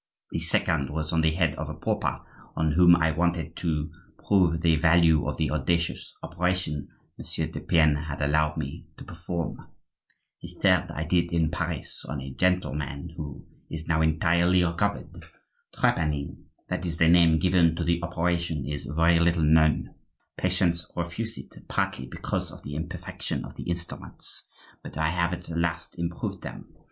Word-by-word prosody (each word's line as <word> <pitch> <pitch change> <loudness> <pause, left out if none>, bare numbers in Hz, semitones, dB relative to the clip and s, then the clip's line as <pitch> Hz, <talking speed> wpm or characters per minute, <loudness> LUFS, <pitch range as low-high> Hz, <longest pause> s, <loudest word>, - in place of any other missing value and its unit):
The - - -1
second 70 -5 0
was 75 +1 -3
on 80 - +3
the 80 - +4
head 80 -1 +1
of - - -4
a - - -5
pauper, - - -1 0.3
on 80 -1 +1
whom 85 +2 +7
I 80 -1 +2
wanted 85 0 -1
to 80 -3 -1 0.4
prove 85 -5 +3
the 85 -2 +4
value 80 -1 +4
of - - -2
the 80 - 0
audacious 85 +3 -1
operation 90 -4 -1 0.3
Monsieur - - -3
de - - -6
Pienne 75 -3 +3
had 75 -2 -5
allowed 75 +2 +1
me 70 -3 -5
to - - -9
perform. 85 0 -4 0.8
The - - -10
third 90 -2 +4
I 80 -1 -3
did 85 +1 +1
in 80 -2 +1
Paris - - -4
on 75 - -4
a 65 0 -7
gentleman 80 -4 -1
who 75 -5 -7 0.2
is 80 0 -6
now 80 -1 +1
entirely 85 +3 +3
recovered. 90 +4 -2 0.5
Trepanning—that 75 +2 -2
is 85 -2 -3
the 80 - +4
name 85 -1 +6
given 85 -2 +3
to - - -2
the 85 0 +1
operation—is 85 -4 -1
very 80 +3 +3
little 85 -1 +3
known. 80 0 +3 0.4
Patients 90 -2 0
refuse 85 +7 -3
it, - - -11
partly 65 - -1
because - - -3
of - - -12
the 70 - -6
imperfection 80 +4 -4
of - - -11
the - - -6
instruments; 85 0 -7 0.3
but - - -9
I 80 0 +2
have 85 +1 +1
at 90 0 -5
last 85 0 -2
improved 85 0 -3
them. - - -9
85 Hz, 160 wpm, -27 LUFS, 75-85 Hz, 0.8 s, whom